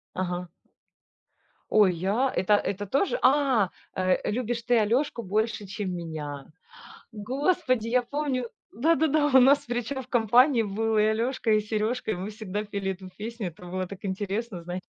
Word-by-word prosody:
Ага. 180 Hz, -1 st, -3 dB, 1.2 s
Ой, 205 Hz, -4 st, +5 dB
я 200 Hz, +10 st, 0 dB
это 190 Hz, +3 st, +2 dB
это 205 Hz, +1 st, -3 dB
тоже. 395 Hz, -, +1 dB
А, 260 Hz, -8 st, +4 dB, 0.3 s
э 185 Hz, +1 st, +1 dB
"любишь 235 Hz, 0 st, -2 dB
ты 245 Hz, -1 st, +3 dB
Алёшку 235 Hz, +4 st, +1 dB
больше, 215 Hz, +1 st, -1 dB
чем 195 Hz, -1 st, -4 dB
меня". 150 Hz, -5 st, -6 dB, 0.7 s
Господи, 255 Hz, -, 0 dB
я 250 Hz, +1 st, +3 dB
помню 260 Hz, -2 st, -2 dB, 0.2 s
Да-да-да, 310 Hz, +3 st, +2 dB
у 265 Hz, -2 st, +6 dB
нас, 270 Hz, -1 st, +4 dB
причём, 245 Hz, +3 st, -2 dB
в 250 Hz, -, -16 dB
компании 240 Hz, +1 st, +4 dB
был 220 Hz, +2 st, -1 dB
и 215 Hz, +1 st, +3 dB
Алёшка, 235 Hz, +1 st, -1 dB
и 215 Hz, 0 st, +4 dB
Серёжка, 215 Hz, +3 st, -2 dB
и -, -, -1 dB
мы 185 Hz, +2 st, -5 dB
всегда 210 Hz, -1 st, -4 dB
пели 200 Hz, -2 st, -5 dB
эту 185 Hz, 0 st, -11 dB
песню. 225 Hz, -2 st, -4 dB
Это 175 Hz, +2 st, -12 dB
было 185 Hz, 0 st, -2 dB
так 200 Hz, +2 st, -11 dB
интересно, 195 Hz, 0 st, -3 dB
знае 180 Hz, +2 st, -5 dB
220 Hz, 155 wpm, -26 LUFS, 190-250 Hz, 1.2 s, у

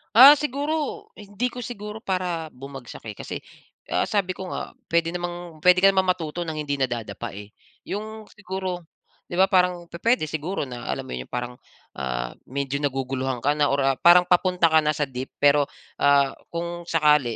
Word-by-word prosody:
Ah, 275 Hz, +5 st, +11 dB
siguro 295 Hz, +2 st, -2 dB
hindi 205 Hz, +4 st, -3 dB
ko 245 Hz, -, -8 dB
siguro 215 Hz, -2 st, -6 dB
para 180 Hz, -5 st, -2 dB
bumagsak, 135 Hz, -1 st, -10 dB
eh. -, -, -12 dB
Kasi, -, -, -6 dB, 0.6 s
ah, -, -, +1 dB
sabi 200 Hz, -4 st, 0 dB
ko 190 Hz, -, -6 dB
nga, -, -, -5 dB, 0.2 s
puwede 165 Hz, 0 st, +1 dB
namang 175 Hz, -2 st, -6 dB
puwede 180 Hz, +2 st, +6 dB
ka 195 Hz, -, +9 dB
namang 190 Hz, -1 st, +1 dB
matuto 170 Hz, 0 st, -4 dB
ng 160 Hz, -, -3 dB
hindi 145 Hz, -2 st, -2 dB
nadadapa, 120 Hz, -3 st, -3 dB
eh. 105 Hz, 0 st, -10 dB, 0.3 s
Yung 215 Hz, +2 st, -5 dB
siguro, 185 Hz, -3 st, -5 dB, 0.4 s
'di 175 Hz, -, -6 dB
ba, 190 Hz, +1 st, +4 dB
parang 180 Hz, -2 st, +2 dB
pupuwede 225 Hz, +4 st, +1 dB
siguro 160 Hz, +5 st, -3 dB
na 125 Hz, -3 st, -7 dB
alam -, -, -2 dB
mo -, -, -8 dB
yun 65 Hz, -, -7 dB
parang, 125 Hz, 0 st, -5 dB, 0.4 s
ah, -, -, -2 dB, 0.2 s
medyo 140 Hz, +1 st, -2 dB
naguguluhan 135 Hz, -2 st, -2 dB
ka 145 Hz, +1 st, +2 dB
na 145 Hz, -, +4 dB
or, 140 Hz, -, +1 dB
ah, 135 Hz, -1 st, +2 dB
parang 175 Hz, +1 st, +7 dB
papunta 180 Hz, -2 st, +3 dB
ka 160 Hz, -, +6 dB
na 150 Hz, -1 st, +1 dB
sa 150 Hz, -, 0 dB
deep. 130 Hz, +1 st, -6 dB
Pero, 145 Hz, 0 st, +5 dB, 0.3 s
ah, 140 Hz, -1 st, +4 dB, 0.2 s
kung 170 Hz, 0 st, -5 dB
sakali, 150 Hz, -7 st, +3 dB
165 Hz, 180 wpm, -24 LUFS, 135-185 Hz, 0.6 s, Ah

